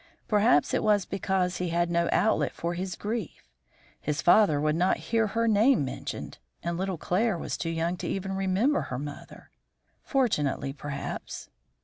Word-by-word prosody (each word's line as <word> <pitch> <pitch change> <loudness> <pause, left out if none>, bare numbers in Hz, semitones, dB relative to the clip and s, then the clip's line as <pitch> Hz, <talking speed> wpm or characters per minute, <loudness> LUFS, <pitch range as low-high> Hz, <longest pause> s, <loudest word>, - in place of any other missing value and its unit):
Perhaps 205 -9 +3
it - - +2
was 210 -2 +3
because 190 -2 -1
he 180 -1 -2
had 175 +1 0
no 170 0 +1
outlet 220 - +2
for 170 +1 -2
his 185 +1 -4
grief. 215 -3 -5 0.5
His 150 0 -2
father 175 -5 +5
would 155 +1 +1
not 180 +3 +2 0.2
hear 225 -1 +3
her 230 +3 0
name 220 - +4
mentioned, 130 - -6 0.2
and 170 0 -2
little 190 0 -2
Claire 195 +5 0
was - - -4
too 165 - -3
young 165 +2 -1
to - - -5
even 195 0 -3
remember 195 +9 +1
her 125 - -3
mother. 145 +1 -9 0.5
Fortunately, 150 - 0
perhaps." 140 0 -6
180 Hz, 160 wpm, -28 LUFS, 165-210 Hz, 0.5 s, father